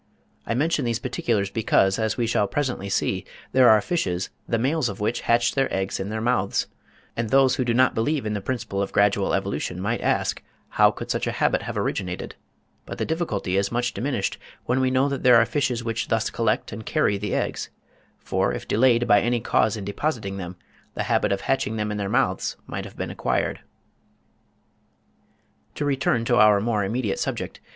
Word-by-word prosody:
I 115 - 0
mention 150 +2 +1
these 115 -2 0
particulars 105 -4 -1
because, 95 -3 +2
as 110 -1 0
we 120 - +1
shall 110 -3 +1
presently 125 -6 -2
see, - - 0 0.3
there 130 -1 +6
are 110 -1 +7
fishes, 95 - -2 0.2
the 115 - +1
males 130 +2 +1
of 100 - -7
which 110 +3 -1
hatch 120 0 +3
their 135 -1 0
eggs 95 0 -2
in 95 +1 -3
their 110 +1 -3
mouths; 115 -4 +1 0.5
and 115 -1 -2
those 135 +1 +4
who 130 - +1
do 120 - 0
not 130 +1 +4
believe 135 +4 0
in 105 - -1
the 105 - -3
principle 100 -4 -3
of 100 - -2
gradual 100 -1 +2
evolution 90 - -3
might 110 +5 -1
ask - - 0 0.3
how - - +5
could - - -5
such - - -1
a - - 0
habit - - +1
have - - -5
originated; 90 -1 -3 0.5
but - - -6
the - - -1
difficulty 110 - -1
is 100 0 0
much 120 +1 -1
diminished 125 -7 -2 0.3
when 125 +2 +1
we 130 0 +2
know 130 +2 +2
that 140 -1 -3
there 125 -1 +6
are 115 - +5
fishes 125 -2 -1
which 115 -1 -2
thus 115 0 0
collect 115 -2 0
and 110 0 -8
carry 100 -1 +1
the 105 -1 -2
eggs; - - -2 0.5
for - - -1
if - - -7
delayed 120 +1 +3
by 105 - +5
any 120 0 +1
cause 110 -1 +1
in 100 - -6
depositing 100 -2 -2
them, 90 -1 -6 0.4
the - - -1
habit - - +1
of 100 -1 0
hatching 125 -4 0
them 105 -1 -2
in 105 - -3
their 100 -1 -2
mouths 110 -5 0
might - - -5
have - - -12
been - - -4
acquired. - - -1 2.2
To 145 - -2
return 135 -4 +1
to 120 0 +2
our 105 -2 +6
more 105 -1 0
immediate 110 +1 -1
subject. - - -3
115 Hz, 200 wpm, -24 LUFS, 100-125 Hz, 2.2 s, are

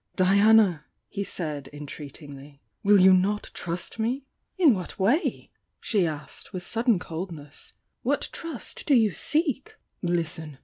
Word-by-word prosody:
"Diana!" 200 -3 +5 0.2
he 200 - -3
said, 150 -8 -4
entreatingly— 145 -1 -10 0.2
"Will 205 -2 +5
you 185 0 +8
not 200 +3 +1
trust 175 +6 -5
me?" 250 +5 -1 0.3
"In 330 -9 +6
what 185 -4 -5
way?" 235 - +1 0.3
she 200 -6 +1
asked, 150 -1 -7
with 180 -1 -4
sudden 230 +2 +2
cold 175 +1 -5
ness 145 -3 -11
— - - -52
"What - - 0
trust 330 -7 -7
do 285 - +5
you 220 -4 +4
seek?" 290 - -1 0.3
"Listen!" 165 -4 -2
185 Hz, 140 wpm, -26 LUFS, 160-220 Hz, 0.3 s, you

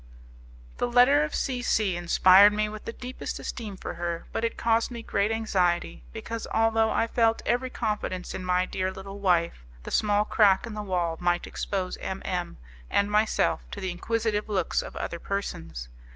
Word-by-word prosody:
The - - +1
letter 250 +5 +5
of 305 - -3
C 255 -2 -1
C 210 -6 +1
inspired 185 +3 +6
me 215 0 0
with 215 0 -8
the - - -4
deepest 250 +2 -6
esteem 210 -5 -6
for - - -6
her, 170 -1 -4
but - - -3
it 230 - -1
caused 230 0 +2
me 235 -2 -7
great 200 -1 0
anxiety, 180 - 0
because, 230 - -6
although 225 0 +3
I 225 - +1
felt 230 -1 +1
every 245 +3 0
confidence 185 -6 -3
in 185 - -5
my 180 0 +2
dear 185 0 -2
little 195 +1 -9
wife, 170 - +1 0.2
the - - -7
small 210 0 +2
crack 200 -3 +4
in 230 - -7
the 210 - -4
wall 175 -5 -1
might 175 0 +1
expose 190 -2 -3
M 190 - -5
M 180 -2 -3 0.3
and 200 +1 +1
myself 210 - +2
to - - -7
the 185 - -3
inquisitive 215 +3 -1
looks 200 -3 0
of - - -9
other 170 - -4
persons. 80 - -4
205 Hz, 180 wpm, -27 LUFS, 180-225 Hz, 0.3 s, inspired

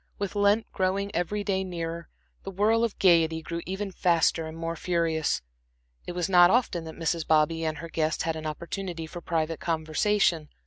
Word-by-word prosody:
With 200 -2 -3
Lent 205 +2 +3
growing 195 +2 -1
every 205 +4 -1
day 190 -2 0
nearer, 170 -2 -5 0.3
the - - -7
whirl 215 +4 +2
of 230 -3 -1
gaiety 165 -3 +3
grew 170 +1 -4
ever 195 +1 -3
faster 165 -2 +2
and 160 +1 -8
more 165 0 -3
furious. 165 - 0 0.6
It - - -4
was 175 -1 -1
not 175 -2 +7
often 190 -7 +1
that 160 - -8
Mrs. 165 -1 -1
Bobby 160 +1 +2
and 155 -1 -2
her 165 - -7
guest 160 -1 -1
had 165 -1 -1
an 155 0 -5
opportunity 170 +2 -5
for 175 +2 -8
private 165 -1 -1
conversation. 165 0 +1
170 Hz, 180 wpm, -27 LUFS, 160-190 Hz, 0.6 s, not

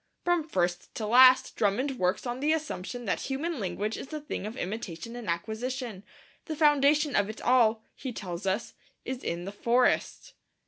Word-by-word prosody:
From 350 -3 +1
first 175 - -1
to 220 - -3
last 255 +3 +6
Drummond 250 +6 0
works 180 +6 0
on 245 +1 -3
the 300 +3 +2
assumption 245 - -4
that 200 - 0
human 285 +3 -3
language 205 +3 -2
is 270 - -8
a 310 - -3
thing 290 -8 -5
of 225 +4 -7
imitation 200 +1 -5
and 240 -6 -6
acquisition. 220 +4 -3 0.4
The 315 - -4
foundation 295 -1 +4
of 200 +1 +2
it 215 - -7
all, 230 -3 +3
he 265 - -5
tells 185 -3 -5
us, 190 +5 -1 0.3
is 260 0 -5
in 170 +1 -3
the 195 - -5
forest. 240 +4 +1
240 Hz, 175 wpm, -28 LUFS, 200-270 Hz, 0.4 s, last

